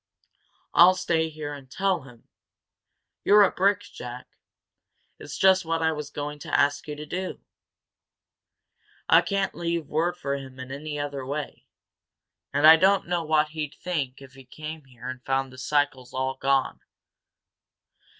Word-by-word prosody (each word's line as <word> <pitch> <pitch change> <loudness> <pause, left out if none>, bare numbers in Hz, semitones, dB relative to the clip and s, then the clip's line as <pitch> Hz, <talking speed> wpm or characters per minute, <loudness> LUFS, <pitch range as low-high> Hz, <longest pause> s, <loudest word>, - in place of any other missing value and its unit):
"I'll 180 +2 +7
stay 165 -3 0
here 150 -1 -6
and 135 -2 -11
tell 190 +4 0
him 125 -4 -16 0.5
" - - -57
"You're 210 0 +7
a 195 - +3
brick, 200 +1 +2
Jack! 125 +1 -9 0.9
It's - - -8
just 190 0 +5
what 165 0 -1
I 160 - +3
was 150 -2 -5
going 145 0 -5
to - - -1
ask 145 +1 +1
you 150 - -5
to 150 +1 -8
do. 185 +4 -4 1.7
I - - +7
can't 195 -1 -1
leave 170 -1 -2
word 170 +5 -1
for 140 - -3
him 130 -2 -9
any 140 +4 -6
other 145 -2 -4
way, 145 +3 -5 0.8
and 145 +2 +2
I 160 +1 +10
don't 190 +4 +3
know 175 -1 0
what 155 -1 +2
he'd 150 -2 -5
think 140 -7 -4
if 135 -1 -14
he 135 0 -14
came 155 +3 -8
here 125 -1 -11
and 130 0 -6
found 135 -1 -1
the 130 - -12
cycles 140 -1 -1
and 130 - -3
all 130 0 0
gone. 135 0 0
150 Hz, 160 wpm, -26 LUFS, 135-170 Hz, 1.7 s, I